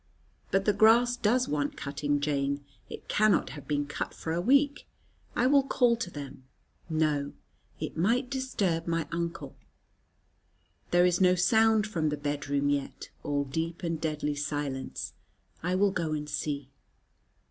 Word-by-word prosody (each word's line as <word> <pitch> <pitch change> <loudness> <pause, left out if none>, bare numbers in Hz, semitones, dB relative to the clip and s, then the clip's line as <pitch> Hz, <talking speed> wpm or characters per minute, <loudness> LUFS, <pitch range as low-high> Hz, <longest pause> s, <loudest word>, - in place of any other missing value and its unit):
But 195 0 +1
the 210 - +4
grass 230 +4 +5
does 245 +2 +2
want 145 -1 -1
cutting, 145 +1 -1
Jane. 140 -1 -1 0.2
It - - -9
cannot 215 -1 +3
have 145 - -10
been 145 -1 0
cut 145 - -5
for 160 - -4
a 170 - 0
week. 280 +7 +3 0.5
I 240 - +2
will 280 +2 +6
call 250 -3 +2
to 225 -6 -3
them. 140 -4 -8 0.5
No, 155 -3 0 0.5
it - - -4
might 230 - +2
disturb 205 -11 -1
my 165 -2 0
uncle. 170 0 -4 1.3
There 175 0 +4
is 180 +1 +2
no 180 -1 +5
sound 220 +3 +4
from 165 -7 -1
the 150 - -2
bed 145 -1 -3
room 140 0 +1
yet: 140 -1 -3
all 145 -1 -1
deep 160 +6 -4
and 165 -2 -2
deadly 150 -2 -1
silence. 145 -2 -4 0.5
I 180 +2 0
will 200 +1 +3
go 165 -4 -2
and 150 -1 -3
see. 140 -2 -3
165 Hz, 155 wpm, -29 LUFS, 145-210 Hz, 1.3 s, will